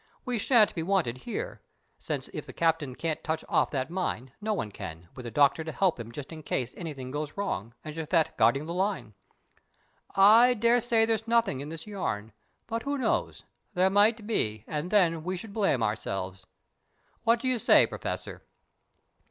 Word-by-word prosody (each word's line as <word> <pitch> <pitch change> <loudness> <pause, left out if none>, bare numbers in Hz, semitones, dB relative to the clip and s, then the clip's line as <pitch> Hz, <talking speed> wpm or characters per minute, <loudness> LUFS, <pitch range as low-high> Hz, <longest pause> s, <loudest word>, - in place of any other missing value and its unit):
We 250 -3 -1
shan't 225 -1 +4
be 165 - -3
wanted 165 -9 0
here, - - -4 0.4
since - - -4
if - - -7
the - - -9
Captain 160 -6 0
can't 160 +1 -3
touch 160 0 -2
off - - +2
that 135 +2 -3
mine, 170 -8 -3
no 215 +1 -1
one 115 - -2
can, 85 -2 -8
with 125 - -8
the - - -4
Doctor 140 +4 +3
to 160 - -5
help 185 -4 +1
him 115 0 -7
just 140 +5 -8
in 155 - -8
case 130 -4 -2
anything 140 -7 -6
goes 150 +3 -4
wrong, 115 - -3
and 155 - -5
Japhet 160 +1 0
guarding 140 +2 +3
the 170 - -4
line. 180 - -1 1.0
I 225 +6 +7
daresay 235 0 +3
there's 225 0 -1
nothing 230 - +2
in 145 +2 -6
this 165 0 -7
yarn, 110 - -4 0.3
but 230 0 -3
who 285 +2 -2
knows? 260 - -1 0.3
There 185 +1 +3
might 210 +2 +4
be, 110 - -1
and 155 +3 -3
then 170 -6 +3
we 185 +2 -2
should 200 +3 -8
blame 195 - +1
ourselves. 95 -3 -3 0.8
What 230 0 +4
do 260 - -1
you 255 -2 +2
say, - - +6
Professor?" - - -5
165 Hz, 180 wpm, -28 LUFS, 130-210 Hz, 1.0 s, I